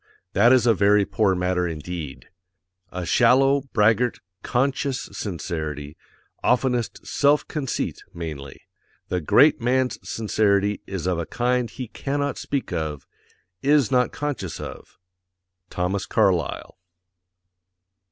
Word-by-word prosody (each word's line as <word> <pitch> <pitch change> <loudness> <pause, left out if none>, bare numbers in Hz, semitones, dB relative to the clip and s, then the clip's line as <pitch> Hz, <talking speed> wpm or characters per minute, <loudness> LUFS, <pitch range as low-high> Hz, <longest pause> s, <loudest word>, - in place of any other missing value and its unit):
That 115 +5 +5
is 130 -3 +5
a 115 - +5
very 100 0 +4
poor 100 -3 +1
matter 90 0 0
indeed_ 80 -3 -6 0.7
A 90 -1 -4
SHALLOW, 135 - +3
BRAGGART, 110 +3 +2 0.2
CONSCIOUS 130 +1 -1
sincerity, 80 -6 -4 0.5
oftenest 125 -2 0
SELF 145 +1 +2
CONCEIT 140 -5 -3
mainly. 75 -5 -7 0.5
The 90 - -1
GREAT 140 - +5
MAN'S 125 +1 +1
SINCERITY 105 -2 0
is 95 -4 -4
of 90 -2 0
a 85 - -4
kind 125 -1 0
he 125 +2 -7
CANNOT 140 +4 -3
SPEAK 140 -2 -3
OF. 75 -3 -3 0.6
Is 140 -4 +3
NOT 125 -1 +3
CONSCIOUS 140 - -4
of. - - -9 0.7
THOMAS 90 +2 -2
CARLYLE. - - 0
105 Hz, 115 wpm, -23 LUFS, 90-130 Hz, 0.7 s, That